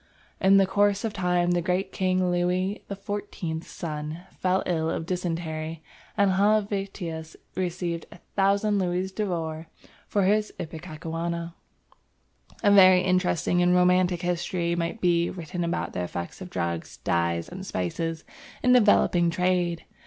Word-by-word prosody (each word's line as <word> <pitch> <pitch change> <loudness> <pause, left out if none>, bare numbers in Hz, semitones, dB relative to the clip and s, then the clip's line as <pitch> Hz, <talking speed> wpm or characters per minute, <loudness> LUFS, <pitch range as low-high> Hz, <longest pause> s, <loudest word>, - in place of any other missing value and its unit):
In 195 +1 +6
the 195 - +5
course 200 +1 +2
of 220 - -2
time 180 -2 +1
the 175 0 +2
great 185 +2 -1
King 185 -1 +1
Louis 180 +3 0
XIV's 195 -4 -5
son 155 0 -5 0.2
fell 185 +1 +1
ill 160 -2 0
of 160 - -2
dysentery, 165 -3 -3 0.3
and 200 -2 +4
Helvetius 195 -5 0 0.2
received 175 -2 -2 0.3
1000 200 +1 +2
louis 185 +1 -1
d'or 165 -6 -3 0.4
for 200 - +1
his 210 +2 +2
ipecacuanha. 165 +1 -5 1.1
A 205 - +5
very 185 -2 +8
interesting 180 -1 +1
and 180 0 +4
romantic 180 0 +3
history 175 0 -1
might 170 +6 -3
be 170 -1 +3
written 175 0 -5
about 170 0 -2
the 90 - -2
effect 85 - -6
of 185 - -7
drugs, 85 - -3
dyes, 85 0 0
and 185 +1 -8
spices 165 - -3 0.4
in 250 - +5
developing 205 -7 +4
trade. 175 -1 0
180 Hz, 130 wpm, -26 LUFS, 165-190 Hz, 1.1 s, very